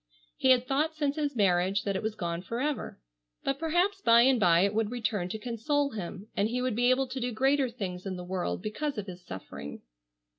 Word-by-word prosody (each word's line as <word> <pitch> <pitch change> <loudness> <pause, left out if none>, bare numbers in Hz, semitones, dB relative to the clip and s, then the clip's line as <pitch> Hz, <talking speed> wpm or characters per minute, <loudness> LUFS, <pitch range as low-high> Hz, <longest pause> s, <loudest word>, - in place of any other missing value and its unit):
He 260 - +1
had 255 -1 +5
thought 305 +4 +1
since 290 -2 0
his 295 -3 -1
marriage 195 -1 +2
that 200 -1 -1
it 190 - -1
was 220 0 -3
gone 170 -3 -3
forever, 255 - -3 0.4
but 275 0 -1
perhaps 350 +5 +1
by 230 0 +6
and 260 -1 +4
by 175 -4 +5
it 200 +2 +2
would 220 -1 +1
return 215 -6 -2
to 220 - -3
console 255 +6 -1
him, 195 -1 -6
and 205 +2 +1
he 245 +2 -1
would 250 -3 -1
be 245 +2 +3
able 260 +1 +3
to 260 +1 -5
do 245 0 -1
greater 270 +3 +2
things 195 -6 -5
in 190 - -3
the 180 - -6
world 180 0 -3
because 275 +6 -3
of 210 - -3
his 180 -2 -9
suffering. 75 - -8
230 Hz, 220 wpm, -29 LUFS, 190-270 Hz, 0.4 s, by